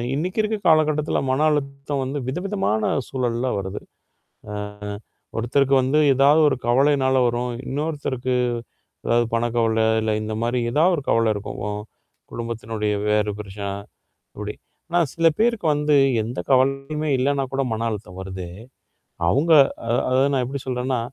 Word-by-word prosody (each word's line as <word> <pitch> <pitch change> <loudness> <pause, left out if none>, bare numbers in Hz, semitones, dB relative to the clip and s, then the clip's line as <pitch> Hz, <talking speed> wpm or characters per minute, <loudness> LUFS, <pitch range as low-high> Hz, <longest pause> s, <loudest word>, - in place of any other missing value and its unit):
இன்னைக்கு 180 +8 -2
இருக்க 215 0 -1
காலகட்டத்தில, 155 -1 +3
மன 130 +3 +1
அழுத்தம் 140 -1 -2
வந்து 135 +3 -3
விதவிதமான 175 - -1 0.3
சூழல்ல 125 -1 -1
வருது. 95 +1 -5
ஆ. - - -44 1.5
ஒருத்தருக்கு 135 +4 +2
வந்து 135 +4 +2 0.2
ஏதாவது 140 +4 +5
ஒரு 145 - 0
கவலைனால 130 +1 +3
வரும். 120 +1 -2
இன்னொருத்தருக்கு, 135 -3 -2 0.7
அதாவது 120 0 +2
பணக்கவல, 115 -1 +1 0.2
இல்ல 110 0 0
இந்த 110 0 -4
மாரி 120 +1 0
ஏதாவது 165 +7 +4
ஒரு 145 - -4
கவல 115 -1 +3
இருக்கும். 105 0 -6 0.7
குடும்பத்தினுடைய 115 -2 -3 0.2
வேறு 105 0 +2
பிரச்சனை 100 -1 -6 0.7
அப்டி. 105 0 -5 0.3
ஆனா, 175 +1 +2 0.2
சில 165 0 +4
பேருக்கு 225 -6 +2
வந்து 150 0 +2 0.3
எந்த 120 +4 -5
கவலையுமே 135 +4 +1
இல்லன்னா 135 +1 +1
கூட, 135 - +1
மன 115 +1 -2
அழுத்தம் 100 -3 -7
வருதே? 95 -2 -6 0.8
அவங்க 150 - +2 0.4
அ - - +2 0.2
அத 130 +1 +3
நான் 130 -2 +1
எப்படி 135 +1 -5
சொல்றேன்னா, 125 0 -1
130 Hz, 135 wpm, -22 LUFS, 115-145 Hz, 1.5 s, ஏதாவது